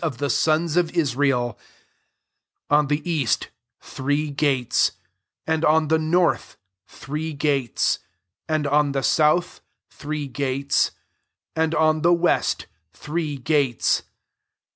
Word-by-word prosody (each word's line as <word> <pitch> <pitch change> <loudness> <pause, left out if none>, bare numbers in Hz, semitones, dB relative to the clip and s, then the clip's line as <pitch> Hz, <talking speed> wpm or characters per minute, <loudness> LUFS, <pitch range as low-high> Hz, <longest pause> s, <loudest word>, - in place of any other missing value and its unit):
of 155 -7 -2
the 140 +2 -1
sons 160 0 +1
of 175 -2 +3
Israel: 135 -5 +1 1.1
13 - - +6
on 150 - 0
the 150 +3 -2
east, 150 -8 0 0.3
three 145 +2 -2
gates; 135 -4 +1 0.5
and 160 0 0
on 155 -1 +3
the 160 0 +3
north, 170 +3 +1 0.3
three 155 +3 -5
gates; 140 -5 0 0.5
and 155 -1 0
on 145 0 +2
the 135 -1 -1
south, 155 +3 +2 0.3
three 150 0 -5
gates; 140 0 0 0.7
and 160 0 +1
on 155 0 +2
the 175 +2 +4
west, 175 0 +1 0.3
three 155 -2 -4
gates. 135 -2 +1
150 Hz, 120 wpm, -23 LUFS, 140-160 Hz, 1.1 s, 13